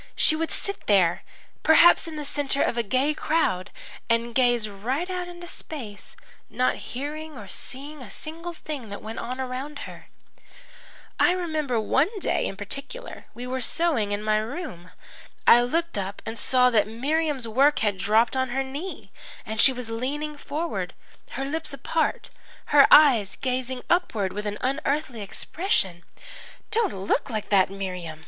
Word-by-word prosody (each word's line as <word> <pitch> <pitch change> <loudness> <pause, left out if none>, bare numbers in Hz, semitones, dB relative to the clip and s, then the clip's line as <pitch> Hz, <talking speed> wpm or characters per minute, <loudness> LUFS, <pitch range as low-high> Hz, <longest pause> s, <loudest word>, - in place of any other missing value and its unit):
She 310 - +5
would 325 +1 -1
sit 400 -1 -5
there, 185 -5 +4 0.4
perhaps 335 +2 +6
in 320 - -6
the 300 -1 -5
centre 280 -1 +1
of - - 0
a 235 - +2
gay 260 +7 +1
crowd, 300 - 0 0.4
and 230 +1 +1
gaze 240 -3 +3
right 245 - -3
out 365 -1 -3
into 350 0 -9
space, 245 -12 -8 0.3
not 255 0 +1
hearing 300 +3 -6
or 205 - -9
seeing 280 +8 -5
a 240 - -9
single 330 - -5
thing 290 -8 -7
that 200 - -7
went 220 +1 -6
on 250 +2 -5
around 265 +3 -4
her. - - -12 1.1
"I 355 - +5
remember 310 -9 -1
one 270 - +2
day 390 - 0
in 195 - -6
particular; 280 - -5
we 245 +1 -6
were 255 +1 -3
sewing 260 -7 +1
in 205 +1 -2
my 215 0 +2
room. 220 - -5 0.6
I 240 - +8
looked 330 +1 -1
up 195 +1 -5
and 225 - -4
saw 250 +1 +3
that 215 -3 +3
Miriam's 275 +3 -1
work 275 +6 +4
had 200 -2 0
dropped 220 +5 +3
on 260 0 0
her 270 +2 0
knee 285 +8 -7 0.3
and 220 +1 0
she - - +7
was 250 -3 -6
leaning 290 +6 -3
forward, 305 +3 -4 0.4
her 270 - -3
lips 305 0 -3
apart, 310 +4 -1 0.4
her 285 -1 +8
eyes 245 -10 +6
gazing 255 -1 -2
upward 225 - +1
with 210 +1 -4
an 205 0 -3
unearthly 270 -2 -1
expression. 195 - -1 0.7
"'Don't 445 -4 +2
look 195 +9 -1
like 215 -3 -4
that, 195 -3 +4
Miriam!' 180 -5 -5
260 Hz, 160 wpm, -25 LUFS, 215-305 Hz, 1.1 s, I